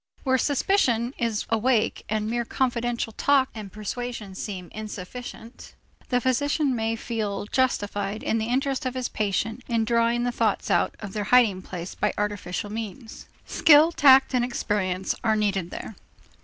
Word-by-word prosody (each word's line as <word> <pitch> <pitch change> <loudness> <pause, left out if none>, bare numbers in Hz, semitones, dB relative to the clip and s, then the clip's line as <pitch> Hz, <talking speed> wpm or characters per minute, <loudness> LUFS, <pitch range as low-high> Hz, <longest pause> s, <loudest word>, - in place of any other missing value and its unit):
Where 260 -2 +2
suspicion 260 - +1
is 230 -3 -1
awake 225 0 +1
and 215 0 -1
mere 235 +1 -1
confidential 240 -2 -1
talk 275 +1 +3
and 210 -4 -8
persuasion 215 0 -5
seem 185 -3 -6
insufficient, 215 +3 -8 0.3
the 250 - +2
physician 270 +2 +1
may 225 0 -1
feel 215 -4 -3
justified 205 -4 -1
in 225 - 0
the 220 - -2
interest 265 +1 0
of 255 - -4
his 255 -2 -1
patient 220 +3 -1
in 230 -2 +1
drawing 235 +1 +2
the 245 - 0
thoughts 225 -4 0
out - - +2
of 200 -2 -7
their 210 -2 -2
hiding 215 -5 +4
place 180 -1 -7
by - - -1
artificial 205 -1 -3
means. 225 +2 -7 0.2
Skill, 315 0 +6
tact, 270 -4 +6
and 250 -1 +2
experience 190 -6 -1
are 220 -2 +3
needed 200 -4 0
there. 220 - -7
225 Hz, 155 wpm, -25 LUFS, 210-250 Hz, 0.3 s, Skill